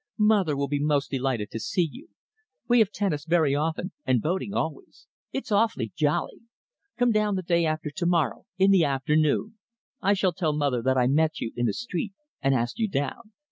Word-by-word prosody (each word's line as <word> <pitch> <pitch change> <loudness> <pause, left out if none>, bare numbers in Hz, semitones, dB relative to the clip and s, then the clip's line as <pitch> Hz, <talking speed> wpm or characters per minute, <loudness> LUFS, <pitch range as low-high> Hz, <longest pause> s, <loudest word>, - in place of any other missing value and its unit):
"Mother 205 -9 +3
will 140 0 0
be 145 +1 -1
most 145 -1 +1
delighted 130 -6 -1
to 115 - -4
see 165 - 0
you. 300 +6 -12 0.6
We 240 0 +5
have 215 -4 +4
tennis 180 -10 -1
very 160 -3 +2
often, 160 +5 -1
and 130 -3 +2
boating 185 - -2
always. 160 -6 -4 0.3
It's 270 - -5
awfully 205 - +1
jolly. 150 -1 0 0.6
Come 245 0 +3
down 215 -2 +1
the 185 - -2
day 170 -1 +2
after 155 -1 -2
to 175 +4 -3
morrow 170 -8 0
in 195 +1 +5
the 190 -4 +5
afternoon. 150 +9 +1 0.4
I 200 0 +3
shall 190 -2 +1
tell 160 -2 0
mother 140 -5 0
that 130 +2 +1
I 125 - +4
met 155 +5 +2
you 115 - -4
in 120 0 0
the - - +2
street 210 -4 -4 0.3
and 135 -1 +2
asked 120 - -2
you 225 - +2
down. 160 - -3
160 Hz, 195 wpm, -26 LUFS, 140-195 Hz, 0.6 s, We